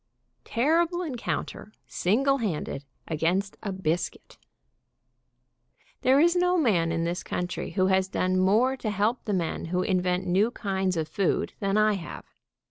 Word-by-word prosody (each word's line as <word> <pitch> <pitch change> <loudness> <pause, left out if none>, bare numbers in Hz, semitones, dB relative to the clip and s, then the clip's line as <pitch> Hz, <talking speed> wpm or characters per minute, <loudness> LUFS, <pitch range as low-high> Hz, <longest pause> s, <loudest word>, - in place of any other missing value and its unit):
TERRIBLE 335 +8 +1
ENCOUNTER 245 -6 -4
SINGLE 275 +9 +1
HANDED 155 - -3 0.2
AGAINST 175 +5 0
A 200 - -3
BISCUIT. 175 -2 -3 1.6
There 265 +2 +4
is 340 +3 +4
no 360 0 +3
man 185 - +2
in 165 0 -1
this 170 +2 -2
country 180 0 -4
who 185 -2 +2
has 190 0 +2
done 185 -1 0
more 220 +8 +3
to 230 - -3
help 210 +4 0
the 210 - -1
men 175 -4 -2
who 180 +2 -1
invent 180 -1 0
new 195 +6 +3
kinds 190 -6 -2
of 160 -1 -1
food 185 +4 0
than 195 0 0
I 215 0 +4
have. 185 -4 -7
195 Hz, 145 wpm, -27 LUFS, 180-240 Hz, 1.6 s, There